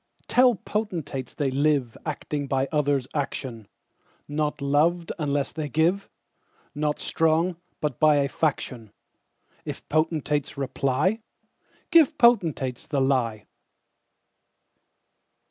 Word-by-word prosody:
Tell 250 -1 +5
potentates, 170 - -4
they 140 -3 0
liveActing 145 +1 -1
by 135 0 +1
others' 145 -4 +1
action; 130 -6 -4 0.6
Not 150 +1 -1
loved 155 +5 +1
unless 145 -2 -1
they 155 -2 -4
give, 170 +7 +1 0.6
Not 150 0 -1
strong, 165 +2 +1 0.2
but 150 -6 -2
by 155 -1 +5
a 140 -1 +2
faction:If 125 -7 -6
potentates 155 -2 0
reply, 140 - 0 0.7
Give 325 -2 +5
potentates 165 - +2
the 145 - 0
lie. 125 -6 0
150 Hz, 95 wpm, -25 LUFS, 135-165 Hz, 0.7 s, Tell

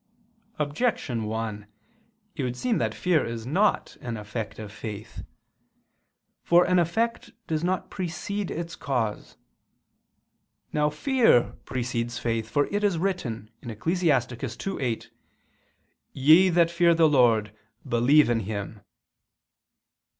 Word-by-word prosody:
Objection 145 - -1
1: 110 -1 -4 0.7
It 150 - -3
would 125 -1 -2
seem 240 - 0
that - - -1
fear 175 -4 +2
is 115 -1 -5
not 195 +10 +1
an 120 -2 -4
effect 105 +1 -6
of 105 -2 -8
faith. 110 -1 -8 1.2
For 175 +1 +4
an 180 0 +3
effect 225 +8 -1
does 160 0 -2
not 185 +1 -1
precede 190 +3 -4
its 170 +1 -5
cause. 115 -6 -3 1.4
Now 150 0 +2
fear 225 - +3
precedes 120 -2 -3
faith: 115 -2 -2
for 145 -1 +2
it 205 +1 0
is 200 -5 +2
written 135 - -3
(Ecclus. 160 - -3
2:8): 130 -1 -1 1.0
"Ye 160 +8 +6
that 170 -1 +3
fear 170 0 +4
the 165 -1 +5
Lord, 115 -7 +3 0.3
believe 130 +6 +4
in 120 -1 +1
Him." 105 0 -5
140 Hz, 115 wpm, -26 LUFS, 115-175 Hz, 1.4 s, Ye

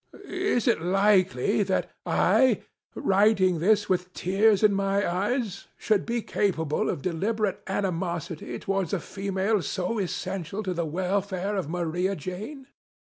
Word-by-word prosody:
Is 370 - 0
it 235 -9 +3
likely 190 -3 +3
that 190 -1 0 0.2
I, 255 -5 +3 0.3
writing 190 -3 +3
this 205 +4 +3
with 180 -1 0
tears 200 +3 +2
in 210 -1 +5
my 195 +1 +1
eyes, 205 +3 -2
should 215 -3 +1
be 235 -1 -1
capable 160 -7 0
of 140 - -3
deliberate 200 +4 -1
animosity 175 -4 -3
towards 195 -3 -2
a - - +1
female, 195 +1 -1
so 185 +6 -2
essential 190 +1 -3
to 185 -2 -2
the 170 -2 -2
welfare 190 +3 -1
of 185 -7 -2
Maria 175 +3 -1
Jane? 205 - -7
195 Hz, 135 wpm, -26 LUFS, 180-210 Hz, 0.3 s, in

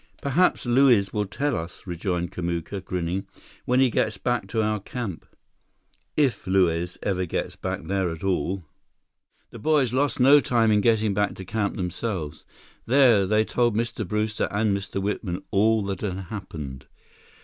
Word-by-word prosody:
"Perhaps 150 +5 +2
Luiz 120 -6 +4
will 105 -1 -1
tell 140 +7 -1
us," 85 +2 -6
rejoined 90 -1 -2
Kamuka, 85 +2 -3
grinning, 90 +1 -3 0.4
"when 125 +1 +2
he 130 -2 +4
gets 110 -1 0
back 120 -5 -1
to 110 +2 0
our 105 0 0
camp." 100 -4 -6 0.9
"If 130 -10 +1
Luiz 90 -2 +1
ever 95 -2 -1
gets - - -3
back - - -4
there 95 -2 0
at 80 +1 -7
all!" 95 0 -1 0.9
The - - -10
boys 140 -2 +2
lost 140 +2 +1
no 140 +3 +7
time 115 -4 +2
in 105 -1 +4
getting 110 -2 +2
back 105 +1 0
to 95 - -8
camp 105 +1 -1
themselves. 90 -4 -4 0.4
There, 120 -6 +5
they 110 +1 +3
told 120 -2 +1
Mr. 115 0 -1
Brewster 105 +2 -1
and 105 0 +1
Mr. 100 0 -4
Whitman 95 -2 -3
all 110 +1 +3
that 100 -1 -4
had 95 -4 -2
happened. 80 -9 -7
100 Hz, 160 wpm, -25 LUFS, 90-115 Hz, 0.9 s, no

